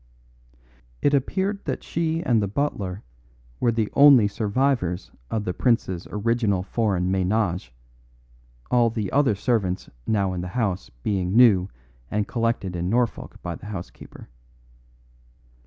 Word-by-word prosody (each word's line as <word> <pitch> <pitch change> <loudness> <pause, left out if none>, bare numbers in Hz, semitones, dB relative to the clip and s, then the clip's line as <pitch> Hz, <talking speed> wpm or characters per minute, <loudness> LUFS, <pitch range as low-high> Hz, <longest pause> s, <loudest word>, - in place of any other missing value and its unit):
It 145 - +3
appeared 190 +9 0
that - - -3
she 165 0 -1
and 115 -7 +2
the 100 - 0
butler 100 -5 -2 0.6
were 120 - +2
the 110 -2 -1
only 140 -7 +7
survivors 110 -3 -1 0.2
of 110 -2 -2
the 90 - -1
prince's 95 -6 0
original 105 -3 0
foreign 95 -4 0
menage 95 - 0 1.0
the 115 -4 +2
other 140 -6 +3
servants 100 -4 -1 0.2
now 100 -4 +1
in 90 - -3
the 90 - -5
house 100 -6 -1
being 95 -2 -1
new 105 -7 +6 0.4
and 105 -1 -1
collected 115 -6 -1
in 90 +1 -2
Norfolk 120 -1 -1
by 85 - -3
the 105 - -10
housekeeper. 95 -4 -9
105 Hz, 125 wpm, -24 LUFS, 95-120 Hz, 1.0 s, only